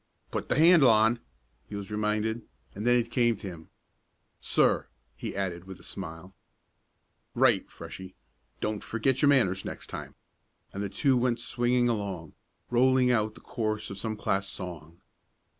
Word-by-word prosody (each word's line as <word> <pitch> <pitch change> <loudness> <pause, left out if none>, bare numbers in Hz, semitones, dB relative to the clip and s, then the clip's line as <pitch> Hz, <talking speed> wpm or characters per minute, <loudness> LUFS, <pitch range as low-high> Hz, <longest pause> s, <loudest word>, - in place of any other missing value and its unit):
"Put - - -3
the - - +2
handle 160 -3 +7
on," 110 +2 +5 0.5
he 105 - -6
was 100 0 -6
reminded, 105 +2 0 0.3
and 105 +4 -4
then 120 - +6
it 120 -1 0
came 120 -3 +3
to 100 - -8
him. 85 -3 -9 0.7
"Sir," - - +2 0.3
he - - -6
added 90 -3 -3
with 95 -1 -10
a - - -16
smile. 90 0 -6 1.0
"Right, - - +3
Freshie. 95 0 -10 0.5
Don't 105 -1 -2
forget 125 +4 0
your 145 - +5
manners 95 -9 +3
next - - -7
time," - - -7 0.6
and 100 - -4
the 100 - -2
two 130 +7 +2
went 120 -1 +1
swinging 120 +1 +1
along, 100 -8 -3 0.4
rolling 125 +1 +4
out 110 -2 +1
the - - -14
chorus 110 -3 -3
of 100 - -6
some 110 0 -3
class 100 -1 -1
song. 85 -3 -8
110 Hz, 160 wpm, -28 LUFS, 95-120 Hz, 1.0 s, handle